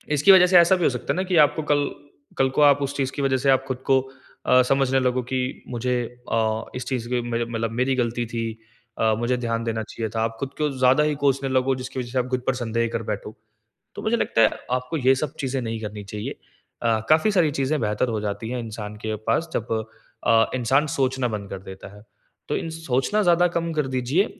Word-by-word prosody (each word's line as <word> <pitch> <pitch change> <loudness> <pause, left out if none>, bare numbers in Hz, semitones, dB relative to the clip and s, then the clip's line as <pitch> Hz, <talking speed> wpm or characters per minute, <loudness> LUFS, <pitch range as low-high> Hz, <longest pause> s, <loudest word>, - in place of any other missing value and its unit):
इसकी 150 +7 +6
वजह 180 -1 +8
से 180 0 +6
ऐसा 170 +2 +6
भी 180 - -2
हो - - +5
सकता 125 -2 -3
है - - -5
ना 185 - +1
कि 185 -1 -1
आपको 155 +2 -3
कल 145 -1 +2 0.5
कल 135 0 +3
को - - +5
आप 145 -1 +6
उस 140 +1 -2
चीज़ 135 -1 -1
की 140 - -4
वज़ह 135 -1 +2
से 135 +1 0
आप 135 0 +4
खुद 130 -2 -2
को 135 - +6 0.5
अ, 125 0 +6
समझने 135 -1 +3
लगो 125 0 +1
की 130 - +1 0.3
मुझे 125 +1 -1 0.4
अ, 110 0 0
इस 125 - -4
चीज़ 125 -3 -2
की 125 -1 0
मुझे 120 0 -2
मतलब 115 -1 -3
मेरी 130 0 +2
गलती 120 -1 -1
थी, 115 0 -4 0.5
अ, 110 -1 +2
मुझे 125 +1 0
ध्यान 115 -1 -2
देना 110 -1 -2
चाहिए 110 0 -5
था। 110 - 0
आप 115 0 -2
खुद 135 - -3
को 150 -1 +1
ज़्यादा 130 +3 +4
ही 150 -1 +1
कोसने 135 0 +2
लगो 130 0 +2
जिसकी 130 0 -6
वज़ह 120 -1 -5
से 130 - 0
आप 125 - -1
खुद 130 - 0
पर 130 - +3
संदेह 115 -1 -1
कर 115 - -2
बैठो। 105 +1 -6 0.6
तो - - -6
मुझे 230 +2 +1
लगता 115 - +1
है 110 - +6 0.2
आपको 125 +6 -1
ये 130 -1 +4
सब 145 +2 -3
चीज़ें 135 -1 -2
नहीं 115 -1 -4
करनी 105 -1 -6
चाहिए। 105 +1 -6 0.4
अ, 115 -2 +2
काफ़ी 160 +7 +4
सारी 175 -6 +3
चीज़ें 140 +2 0
बेहतर 105 +3 0
हो 110 -2 -1
जाती 105 +2 -4
है 125 0 -3
इंसान 105 -2 -6
के 110 - -1
पास 165 0 +1
जब 115 0 -2 0.5
अ, 115 -1 +5
इंसान 130 +5 +2
सोचना 130 -1 +1
बंद 105 -3 -5
कर 95 - -6
देता 95 0 -10
है। 105 - -15 0.5
तो - - 0
इन 165 - -4
सोचना 160 +5 0
ज़्यादा 175 0 +4
कम 170 0 -1
कर 150 -3 0
दीजिए 130 +10 +2
130 Hz, 235 wpm, -23 LUFS, 115-140 Hz, 0.6 s, वजह